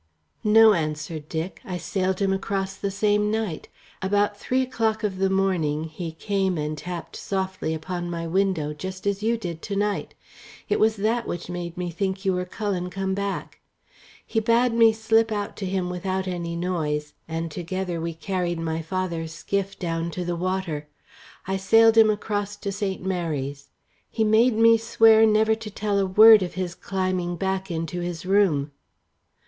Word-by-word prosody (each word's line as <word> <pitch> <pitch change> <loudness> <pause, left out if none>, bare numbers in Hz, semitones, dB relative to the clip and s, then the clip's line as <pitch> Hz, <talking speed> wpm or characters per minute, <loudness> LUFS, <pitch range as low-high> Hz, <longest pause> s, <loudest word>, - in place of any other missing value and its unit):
"No," 220 0 +7
answered 155 -2 -3
Dick. 165 +2 -4
"I 180 -2 -4
sailed 185 0 -1
him 195 -1 +2
across 195 0 -2
the 200 0 -3
same 210 +1 +1
night. 215 -7 -2 0.3
About 205 +2 +1
three 255 +5 0
o'clock 225 -3 -1
of 190 -3 -2
the 195 0 +2
morning 180 -6 +1
he 160 +1 -6
came 190 +1 -1
and 150 0 -2
tapped 170 +2 -7
softly 190 -4 -3
upon 175 +2 -4
my 170 -1 -4
window, 170 -4 0
just 185 +5 -7
as 200 0 0
you 230 +2 +1
did 170 -7 -6
to 200 - -4
night. 205 0 -1 0.5
It - - +1
was 220 0 +3
that 225 +3 0
which 175 +1 -5
made 175 -1 -5
me 180 -1 -3
think 190 +3 -3
you 190 - +3
were 180 0 -1
Cullen 185 -2 -3
come 190 +1 -2
back. 200 0 -4 0.7
He 225 - 0
bade 230 +2 +3
me 230 -1 +6
slip 225 +1 +2
out 205 -1 -3
to 195 - -3
him 185 -1 -1
without 190 +1 -2
any 170 -2 -3
noise, 155 -4 -2
and 165 0 -3
together 180 0 -3
we 165 0 -3
carried 175 0 -2
my 165 0 -2
father's 165 -1 -3
skiff 195 +3 -3
down 165 -1 -2
to 180 - -2
the 175 0 -1
water. 175 -4 -2 0.6
I 190 +1 -1
sailed 225 +4 +5
him 220 -1 +7
across 205 -1 -2
to 200 -1 -4
St. 195 -2 -3
Mary's. 145 -7 -3 0.4
He 225 - 0
made 220 +3 +4
me 230 0 +6
swear 225 -1 +5
never 220 +1 +4
to 220 -1 -5
tell 205 0 -1
a 195 - +1
word 215 +3 +8
of 180 - -4
his 185 -2 -3
climbing 185 -2 -2
back 190 +1 -2
into 165 +1 -3
his 175 -1 -5
room." 180 -8 +2
190 Hz, 175 wpm, -24 LUFS, 170-205 Hz, 0.7 s, word